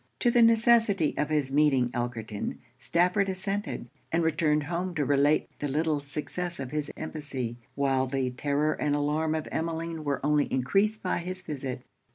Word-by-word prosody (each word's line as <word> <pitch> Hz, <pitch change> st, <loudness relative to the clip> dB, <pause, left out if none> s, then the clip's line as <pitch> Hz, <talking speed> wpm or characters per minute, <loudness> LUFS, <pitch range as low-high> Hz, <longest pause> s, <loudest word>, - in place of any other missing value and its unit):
To 240 Hz, -, +4 dB
the 240 Hz, -, +4 dB
necessity 230 Hz, -7 st, +4 dB
of 150 Hz, -, -1 dB
his 150 Hz, -3 st, 0 dB
meeting 135 Hz, -4 st, +3 dB
Elkerton, 115 Hz, -4 st, -3 dB, 0.2 s
Stafford 180 Hz, +7 st, +2 dB
assented; 195 Hz, -, -3 dB, 0.2 s
and 165 Hz, +1 st, +2 dB
returned 155 Hz, -1 st, +2 dB
home 175 Hz, +3 st, -3 dB
to 150 Hz, -2 st, +1 dB
relate 145 Hz, +2 st, +3 dB
the 145 Hz, -, -1 dB
little 150 Hz, +2 st, +1 dB
success 155 Hz, +5 st, -4 dB
of 130 Hz, -2 st, -5 dB
his 150 Hz, -1 st, -2 dB
embassy, 135 Hz, -7 st, -4 dB, 0.2 s
while 135 Hz, -2 st, +1 dB
the 130 Hz, -1 st, -1 dB
terror 145 Hz, +4 st, 0 dB
and 145 Hz, -1 st, 0 dB
alarm 155 Hz, +2 st, 0 dB
of 155 Hz, -, -3 dB
Emmeline 165 Hz, 0 st, -3 dB
were 140 Hz, -2 st, -1 dB
only 150 Hz, -1 st, +2 dB
encreased 195 Hz, +12 st, +1 dB
by 180 Hz, -, 0 dB
his 185 Hz, +2 st, -5 dB
visit. 135 Hz, -4 st, -5 dB
150 Hz, 165 wpm, -28 LUFS, 140-175 Hz, 0.2 s, To